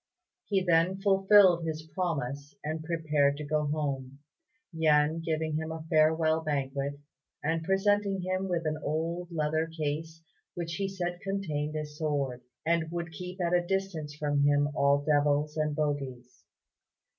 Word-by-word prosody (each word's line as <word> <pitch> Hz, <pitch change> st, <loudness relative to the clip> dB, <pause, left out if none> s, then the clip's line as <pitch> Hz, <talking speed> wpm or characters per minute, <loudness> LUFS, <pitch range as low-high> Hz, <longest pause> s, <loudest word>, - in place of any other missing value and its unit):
He 195 Hz, -3 st, +1 dB
then 175 Hz, +2 st, +3 dB
fulfilled 195 Hz, -2 st, +5 dB
his 160 Hz, -1 st, -3 dB
promise 150 Hz, -4 st, -3 dB
and 155 Hz, +1 st, -3 dB
prepared 155 Hz, -4 st, +1 dB
to 150 Hz, -, -5 dB
go 150 Hz, 0 st, 0 dB
home, 140 Hz, -3 st, -2 dB, 0.6 s
Yen 155 Hz, 0 st, +3 dB
giving 160 Hz, -1 st, -1 dB
him 160 Hz, 0 st, -3 dB
a 160 Hz, -1 st, -6 dB
farewell 160 Hz, 0 st, +3 dB
banquet, 140 Hz, -2 st, -2 dB, 0.4 s
and 160 Hz, +2 st, 0 dB
presenting 195 Hz, +1 st, +2 dB
him 185 Hz, +1 st, -1 dB
with 170 Hz, -2 st, -1 dB
an 155 Hz, 0 st, -1 dB
old 165 Hz, +3 st, -2 dB
leather 155 Hz, 0 st, 0 dB
case 160 Hz, +1 st, -4 dB, 0.3 s
which 165 Hz, -1 st, -4 dB
he 200 Hz, -1 st, -1 dB
said 175 Hz, -2 st, -4 dB
contained 155 Hz, -7 st, -2 dB
a 155 Hz, 0 st, -2 dB
sword, 145 Hz, -4 st, -2 dB, 0.2 s
and 165 Hz, -1 st, +1 dB
would 170 Hz, 0 st, -4 dB
keep 180 Hz, +3 st, -7 dB
at 175 Hz, -1 st, 0 dB
a 175 Hz, -, +4 dB
distance 175 Hz, -5 st, -2 dB
from 145 Hz, -1 st, 0 dB
him 145 Hz, 0 st, +3 dB
all 140 Hz, 0 st, +3 dB
devils 150 Hz, 0 st, +2 dB
and 150 Hz, -1 st, 0 dB
bogies. 130 Hz, -5 st, -3 dB
155 Hz, 145 wpm, -29 LUFS, 145-175 Hz, 0.6 s, fulfilled